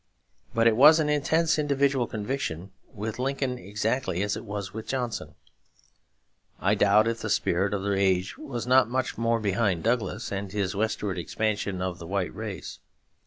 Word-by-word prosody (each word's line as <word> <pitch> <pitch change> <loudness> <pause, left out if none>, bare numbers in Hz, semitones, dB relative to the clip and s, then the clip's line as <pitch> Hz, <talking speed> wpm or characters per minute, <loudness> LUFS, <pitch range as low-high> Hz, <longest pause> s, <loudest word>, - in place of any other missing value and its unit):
But 115 0 +3
it 115 -1 +5
was 150 +6 +8
an 150 -1 +1
intense 155 +2 +2
individual 140 -4 +1
conviction 105 - -4 0.2
with 110 +2 -5
Lincoln 130 -1 -1
exactly 105 -2 -1
as 105 0 -1
it - - -6
was 100 -2 -5
with 110 0 -7
Johnson. 120 - -3 1.2
I 95 +4 +2
doubt 105 +1 +4
if 115 0 -1
the - - -3
spirit 95 +4 +1
of 100 -2 -2
the 100 0 0
age 95 -1 +1
was 120 -3 -5
not 130 -1 +4
much 130 +1 -1
more 115 0 +2
behind 100 -4 0
Douglas 115 -4 -1
and 100 -1 -4
his 100 -1 -2
westward 105 -3 -1
expansion 100 0 -2
of 90 -1 -3
the 85 - -8
white 95 -1 -2
race. 105 -5 -6
110 Hz, 165 wpm, -27 LUFS, 100-125 Hz, 1.2 s, was